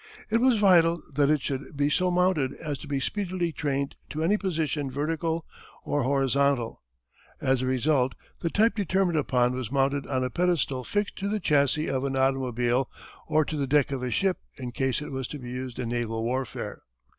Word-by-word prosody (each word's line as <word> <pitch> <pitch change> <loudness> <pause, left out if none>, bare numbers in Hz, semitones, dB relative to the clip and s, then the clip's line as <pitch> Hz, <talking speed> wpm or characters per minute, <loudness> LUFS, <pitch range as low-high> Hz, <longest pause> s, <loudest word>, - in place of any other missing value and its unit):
It 230 +1 +3
was 255 -2 +4
vital 170 -4 +5
that 140 0 +3
it 150 -3 +2
should 140 +1 -4
be 145 0 +3
so 180 +4 +2
mounted 180 -7 +2
as 150 -3 -5
to - - -10
be 140 -1 -1
speedily 180 +1 -2
trained 140 -2 -2
to 155 +1 -3
any 190 +6 +3
position 160 -8 -1
vertical 160 +4 -1 0.4
or 145 - 0
horizontal. 135 -2 +1 0.6
As 130 -1 +1
a 130 - -1
result 130 0 +2 0.2
the 170 - -1
type 220 +6 +3
determined 190 -5 +1
upon 125 -3 +2
was 125 -2 -4
mounted 140 0 +1
on 130 -2 0
a 125 - -2
pedestal 170 -7 +1
fixed 205 +8 -2
to 200 - -2
the 215 +1 0
chassis 150 -2 +2
of 135 -1 -1
an 135 -1 -1
automobile 130 -1 +1 0.4
or 155 0 +3
to 155 - -4
the 140 -2 -1
deck 145 0 +3
of 135 -2 -2
a 125 - -2
ship 185 - +1 0.2
in 125 -2 -5
case 135 +3 -1
it 150 - -7
was 130 -2 -3
to 150 - -6
be 125 -3 -8
used 125 -1 -5
in 120 -2 -3
naval 115 -2 -2
warfare. 125 0 -3
140 Hz, 195 wpm, -27 LUFS, 130-165 Hz, 0.6 s, vital